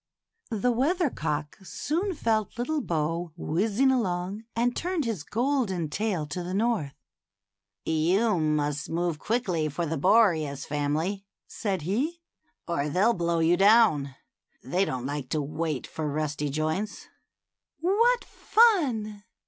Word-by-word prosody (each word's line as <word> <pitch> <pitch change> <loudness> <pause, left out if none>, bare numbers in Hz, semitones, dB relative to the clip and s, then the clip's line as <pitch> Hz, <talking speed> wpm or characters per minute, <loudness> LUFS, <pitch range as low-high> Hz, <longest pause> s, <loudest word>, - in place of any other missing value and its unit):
The 230 +1 +1
weather 295 +6 +1
cock 150 +2 -3
soon 335 - -2
felt 220 -5 0
little 295 +6 -1
Bo 165 - -2
whizzing 210 - +1
along, 195 -3 -1
and 245 +1 +1
turned 355 -4 -1
his 220 -8 -2
golden 225 - -1
tail 195 -4 -1
to 155 +4 -5
the 180 +2 -4
north. 205 -10 0 0.5
" 100 0 -61
You 180 +6 +2
must 150 -1 0
move 170 -1 -1
quickly 185 -9 0
for 170 +4 -2
the 160 -1 -2
Boreas 155 - +3
family," 155 +7 -1 0.2
said 190 -6 -3
he, 265 - -1 0.2
" - - -45
or 150 -4 -1
they'll 200 +9 +3
blow 170 -3 0
you 170 +2 +4
down. 195 - +4 0.5
They 180 +9 +1
don't 130 -5 -4
like 140 -2 -4
to 155 - 0
wait 150 -1 -3
for 155 -1 -4
rusty 150 -1 -2
joints." 155 +8 -2 0.7
"What 460 +8 +3
fun!" 265 - +2
185 Hz, 135 wpm, -27 LUFS, 155-235 Hz, 0.7 s, you